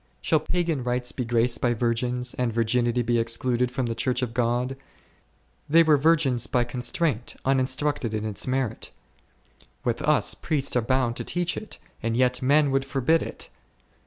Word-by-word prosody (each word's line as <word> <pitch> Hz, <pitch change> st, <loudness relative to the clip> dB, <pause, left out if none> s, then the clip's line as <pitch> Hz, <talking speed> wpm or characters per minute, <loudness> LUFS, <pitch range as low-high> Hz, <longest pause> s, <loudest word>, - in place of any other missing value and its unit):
Shall 160 Hz, -, +2 dB
pagan 165 Hz, -3 st, -1 dB
rites 125 Hz, 0 st, -1 dB
be 125 Hz, -, -3 dB
graced 120 Hz, +1 st, +1 dB
by 120 Hz, -1 st, +1 dB
virgins, 125 Hz, +2 st, -1 dB
and 125 Hz, -2 st, -1 dB
virginity 120 Hz, +2 st, +1 dB
be 120 Hz, 0 st, +1 dB
excluded 120 Hz, +2 st, +1 dB
from 125 Hz, +1 st, -2 dB
the 115 Hz, -, -2 dB
Church 125 Hz, +2 st, -1 dB
of 120 Hz, -2 st, -3 dB
God? 125 Hz, +2 st, 0 dB, 0.9 s
They 165 Hz, +3 st, +6 dB
were 155 Hz, -2 st, +5 dB
virgins 145 Hz, -4 st, +2 dB
by 125 Hz, -, +1 dB
constraint, 125 Hz, +1 st, -1 dB
uninstructed 130 Hz, -1 st, 0 dB
in 110 Hz, 0 st, -3 dB
its 105 Hz, +2 st, -1 dB
merit; 130 Hz, -4 st, -2 dB, 0.9 s
with 120 Hz, -1 st, -1 dB
us 145 Hz, -8 st, +2 dB
priests 145 Hz, -5 st, -1 dB
are 125 Hz, -, +3 dB
bound 125 Hz, 0 st, 0 dB
to -, -, -4 dB
teach 175 Hz, 0 st, -1 dB
it, 215 Hz, -, -8 dB, 0.2 s
and 115 Hz, 0 st, -1 dB
yet 125 Hz, 0 st, +2 dB
men 140 Hz, +2 st, +3 dB
would 135 Hz, 0 st, +1 dB
forbid 135 Hz, +4 st, +1 dB
it -, -, -8 dB
125 Hz, 165 wpm, -25 LUFS, 120-135 Hz, 0.9 s, They